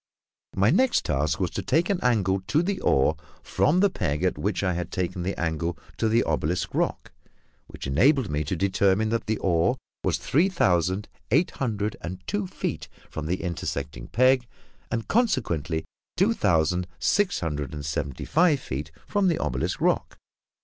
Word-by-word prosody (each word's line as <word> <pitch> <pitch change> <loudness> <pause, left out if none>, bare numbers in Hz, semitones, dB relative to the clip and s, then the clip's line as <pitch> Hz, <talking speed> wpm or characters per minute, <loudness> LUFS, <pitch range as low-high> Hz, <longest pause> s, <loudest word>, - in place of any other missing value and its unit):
My 100 +4 +4
next 260 -1 +3
task 75 +2 0
was 90 -3 0
to - - -3
take 165 +2 +2
an 195 -3 0
angle 100 -6 +2
to 155 - +2
the 190 +1 -2
oar 65 - +3 0.3
from 170 +6 +2
the 200 - +5
peg 75 - -2
at - - +2
which - - -1
I 90 -2 +1
had 85 0 -4
taken 90 0 -2
the 95 +3 -3
angle 85 0 -1 0.2
to 110 - +1
the 115 +2 +3
obelisk 80 +2 -1
rock, - - -1 0.6
which - - -9
enabled 130 - +3
me 75 -2 -1
to 85 - -1
determine 100 +3 +2
that 115 +1 -1
the 110 0 0
oar 85 -3 +2 0.3
was - - +1
three 165 +8 +2
thousand 95 - +1 0.2
eight 150 - +3
hundred 105 -5 -2
and 90 +2 -5
two 205 -2 -2
feet 180 - -4 0.2
from 80 0 -4
the 90 +4 -2
intersecting 80 -8 -4
peg, 130 +1 +3 0.4
and 115 -1 -2
consequently 90 - 0 0.3
two - - +4
thousand 85 +2 +1
six 205 -2 +1
hundred 75 -4 -3
and 75 -2 -6
seventy 70 -2 -3
five 160 -1 +3
feet 75 - -5 0.2
from 205 -2 +1
the 170 - +2
obelisk 65 +1 -2
rock. - - 0
95 Hz, 170 wpm, -26 LUFS, 80-135 Hz, 0.6 s, the